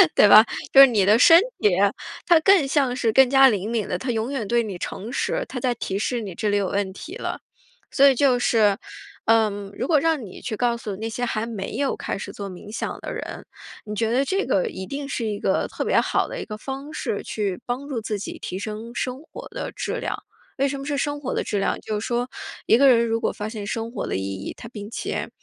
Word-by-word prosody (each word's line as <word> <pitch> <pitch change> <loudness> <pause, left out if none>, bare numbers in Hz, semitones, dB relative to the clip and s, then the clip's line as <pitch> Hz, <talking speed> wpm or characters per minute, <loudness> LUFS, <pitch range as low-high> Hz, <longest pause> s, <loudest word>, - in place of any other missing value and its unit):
对 205 - +6
吧？ 215 +2 +9 0.3
就 270 - +7
是 275 - +11
你 215 -5 +2
的 215 +4 +5
身 330 +5 +9 0.2
体， 210 - +4 0.6
它 340 -3 +6
更 375 -2 +5
像 270 -3 +1
是 230 -3 +1
更 265 +1 +5
加 270 -1 +7
灵 205 0 -2
敏 230 -3 -1
的， 180 - -2
它 255 +3 -3
永 225 +3 -2
远 235 -7 -3
对 235 +1 +2
你 200 -5 -5
诚 210 +6 -6
实， - - -1
它 250 - -4
在 245 -1 0
提 195 -3 -3
示 240 +2 -1
你 195 -4 -6
这 210 - -2
里 205 - +1
有 195 -2 0
问 195 -1 -1
题 320 - -9
了。 - - -4 0.5
所 280 0 +6
以 - - +4
就 255 -1 +3
是， 215 -5 +3 0.5
嗯， 210 -3 +2
如 250 - -2
果 310 -4 +4
让 320 -6 +1
你 185 - -11
去 215 - -4
告 240 -1 +1
诉 210 -4 -6
那 225 +1 -4
些 245 +2 -4
还 225 -2 -1
没 210 -4 -5
有 280 -1 0
开 - - -4
始 - - -7
做 200 -1 -6
冥 185 +3 -11
想 230 - -4
的 - - -6
人， - - -7 0.4
你 210 0 -5
觉 225 +1 0
得 265 +3 +2
这 390 +6 0
个 - - +1
一 190 - -6
定 280 +3 -5
是 240 -4 -3
一 210 -2 -3
个 - - +1
特 - - -4
别 - - +3
好 - - 0
的 - - -6
一 - - -6
个 215 -1 -7
方 270 +5 -7
式 - - -3
去 200 -4 -3
帮 255 +4 -4
助 255 -6 -3
自 210 -2 -3
己 - - -6
提 185 - -5
升 220 +3 -6
生 255 +2 -3
活 - - -10
的 - - -5
质 - - -4
量。 - - -3 0.4
为 275 +1 +2
什 275 - -3
么 275 - -7
是 290 -1 -2
生 290 +1 -2
活 265 - -3
的 - - 0
质 205 - -2
量， - - 0
就 215 -1 -3
是 - - -5
说 245 +1 -1 0.4
一 225 - +5
个 275 +2 +6
人 235 -2 +5
如 225 0 -1
果 - - 0
发 210 0 -5
现 215 -2 -6
生 225 +2 -3
活 235 - -4
的 - - -1
意 - - -3
义， 95 0 -5
他 - - -9
并 210 -3 -8
且， - - -3
230 Hz, 275 characters per minute, -23 LUFS, 210-270 Hz, 0.6 s, 是